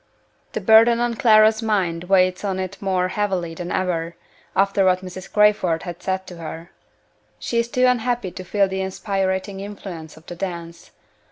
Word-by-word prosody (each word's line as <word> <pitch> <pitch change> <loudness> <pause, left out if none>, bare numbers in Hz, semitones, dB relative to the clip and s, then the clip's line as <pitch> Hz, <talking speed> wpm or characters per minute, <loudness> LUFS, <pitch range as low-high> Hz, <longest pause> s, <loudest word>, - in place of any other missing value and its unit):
The - - -3
burden 230 +1 +6
on 240 0 0
Clara's 220 -1 +5
mind 185 -6 -1
weighs 185 0 +2
on 190 -2 -2
it 190 +1 -5
more 185 -2 0
heavily 185 -5 -2
than 175 +1 -6
ever, 170 -2 -1 0.4
after 195 0 +2
what 185 0 +2
Mrs. 185 0 -9
Crayford 210 -6 +3
has 175 -2 -6
said 190 0 -2
to 180 - -10
her. 165 +1 -8 0.7
She 235 - -1
is 235 - 0
too 250 +1 +1
unhappy 245 -5 0
to 185 +1 -8
feel 200 +2 +1
the 190 0 -3
inspiriting 190 0 -2
influence 190 -6 -8
of 160 - -17
the 175 - -8
dance. 170 -2 -6
190 Hz, 170 wpm, -22 LUFS, 175-210 Hz, 0.7 s, burden